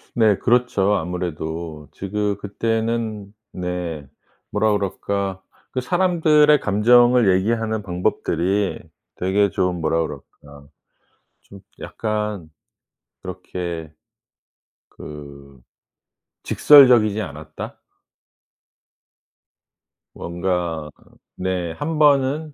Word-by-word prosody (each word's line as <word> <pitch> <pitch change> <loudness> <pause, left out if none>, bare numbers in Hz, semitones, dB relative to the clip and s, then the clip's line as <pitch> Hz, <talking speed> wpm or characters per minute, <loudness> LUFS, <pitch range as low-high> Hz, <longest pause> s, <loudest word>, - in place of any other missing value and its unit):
네. 110 -4 +4
그렇죠. 120 -5 +2
아무래도 80 -3 -4
지금 100 +1 -2
그때는 110 0 -2 0.2
네 90 -5 -4 0.4
뭐라 105 +1 +2
그럴까. 100 -1 -2 0.3
그 130 - -2
사람들의 155 -2 +3
감정을 120 +2 +4
얘기하는 110 +1 -1
방법들이 90 +1 -1 0.4
되게 100 +2 +1
좀 90 -1 -1
뭐라 80 +1 +1
그럴까 70 -2 -9 0.7
좀 100 - -15 0.2
약간 105 -6 -4 0.7
그렇게 85 -3 -6 1.1
그 70 -3 -11 0.8
직설적이지 120 -7 +6
않았다? 75 -1 -9 2.3
뭔가 85 -3 -3 0.5
네. 90 -2 -2
1 155 - -4
번은 145 +1 +3
100 Hz, 170 characters per minute, -21 LUFS, 85-115 Hz, 2.3 s, 직설적이지